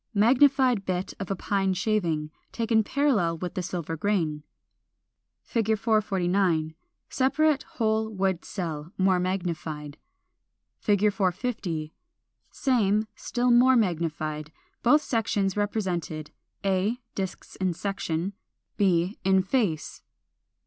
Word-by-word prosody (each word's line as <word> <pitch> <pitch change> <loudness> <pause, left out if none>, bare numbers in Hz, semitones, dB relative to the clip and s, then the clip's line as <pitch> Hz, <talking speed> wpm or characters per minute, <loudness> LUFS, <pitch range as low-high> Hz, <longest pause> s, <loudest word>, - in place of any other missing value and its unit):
Magnified 255 +1 +4
bit 185 0 -2
of 195 - -5
a 195 - 0
pine 195 0 0
shaving, 170 -8 0 0.2
taken 225 -1 +2
parallel 210 - +1
with 180 +1 -5
the 185 - -2
silver 170 -2 -4
grain. 160 -4 0 1.0
449. 200 -7 +1 0.3
Separate 290 +2 +2
whole 220 -1 +1
wood 190 -4 -1
cell, 165 -5 -5
more 185 -1 +3
magnified. 165 -5 -3 0.8
450. 195 -4 0 0.6
Same, 215 -5 +1
still 245 0 0
more 250 +2 +6
magnified; 155 -6 -1 0.3
both 295 +5 +5
sections 205 -5 0
represented: 185 -7 -2 0.3
a, 195 +4 +1 0.2
disks 190 -2 -5
in 185 -1 0
section, 190 0 -3 0.4
b, 185 -1 +2
in 190 0 +4
face. 190 - -1
195 Hz, 100 wpm, -27 LUFS, 170-220 Hz, 1.0 s, more